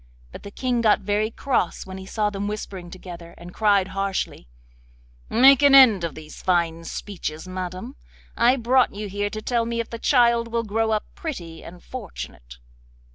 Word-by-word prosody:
But - - -10
the 200 - -9
King 245 +2 -1
got 215 -3 +3
very 205 +2 0
cross 240 -5 -1
when 190 0 -8
he 190 - -10
saw 210 0 -1
them 200 0 -3
whispering 195 -4 -6
together, 170 -2 -10
and 175 +1 -11
cried 200 -3 +2
harshly: 195 - -3 0.8
'Make 265 +3 +6
an 285 -1 +7
end 230 -9 +7
of 170 - -3
these 155 -1 -11
fine 170 -2 0
speeches, 170 -5 -6
madam. 185 +7 -6 0.4
I 240 +2 +4
brought 255 -2 +2
you 210 0 -5
here 205 +1 -2
to 215 +1 -7
tell 240 -2 +1
me 235 0 -2
if 230 - -4
the 230 - -6
child 235 -3 +3
will 230 0 -1
grow 220 +1 0
up 215 -1 0
pretty 175 - -7
and 175 +1 -12
fortunate. 65 - -9
205 Hz, 180 wpm, -23 LUFS, 185-235 Hz, 0.8 s, an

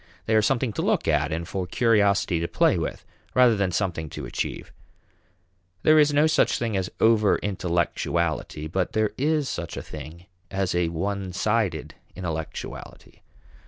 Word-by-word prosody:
They 110 - 0
are 110 - +5
something 120 +1 +1
to - - -2
look - - +1
at - - +2
and 85 +2 -3
for 95 -1 -3
curiosity 100 -4 +2
to 85 - -1
play - - +3
with - - -4 0.3
rather 125 -3 +6
than 100 -3 0
something 85 -4 -2
to - - -7
achieve. - - -4 1.1
There 155 0 +6
is 150 -1 +5
no 145 +1 +4
such 155 - +3
thing 115 -3 -2
as 95 -1 -1
over 110 -3 +4
intellectuality, 85 -4 -1
but 90 +4 -2
there 110 -1 +1
is 150 +1 +1
such 85 -9 -5
a - - -4
thing 85 +3 -10 0.2
as 95 -2 -1
a 90 -1 +1
one 95 +2 -3
sided 105 -5 0 0.2
intellectuality. 80 -4 -6
95 Hz, 160 wpm, -25 LUFS, 85-115 Hz, 1.1 s, rather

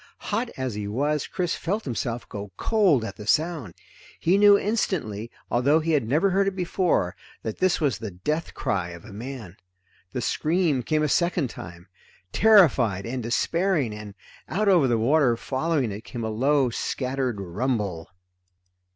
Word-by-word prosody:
Hot 230 +4 0
as 130 -3 -2
he 105 0 -4
was, 145 +7 -1
Chris 180 -3 -2
felt 205 +6 -2
himself 120 -2 -3
go 100 -1 -7
cold 190 - +3
at - - -7
the 105 -1 -9
sound. 155 - 0 0.4
He 175 +3 +3
knew 205 0 +7
instantly, 155 - -2 0.2
although 140 +6 +3
he 165 +1 -1
had 145 -8 +1
never 160 - +2
heard 195 +1 +2
it 195 - -1
before, 180 - 0 0.3
that 110 - -5
this 185 -1 +2
was 145 -6 0
the 110 - -5
death 150 - -3
cry 90 -3 -1
of 85 -1 -10
a 110 - -11
man. 115 -4 -8 0.5
The 125 - -3
scream 155 +1 +1
came 155 +5 0
a - - +2
second 170 -3 +1
time, 85 +1 -10 0.5
terrified 140 - +5
and 125 +2 -3
despairing, 150 - 0
and 105 -1 -9 0.3
out 210 +5 0
over 175 -8 +5
the 120 -2 +2
water 125 +1 +3
following 135 -2 -1
it 100 +2 -6
came 120 -1 -6
a 110 - -2
low, 135 +3 +2
scattered 130 -2 -2
rumble. 100 -2 -2
130 Hz, 165 wpm, -25 LUFS, 110-170 Hz, 0.5 s, knew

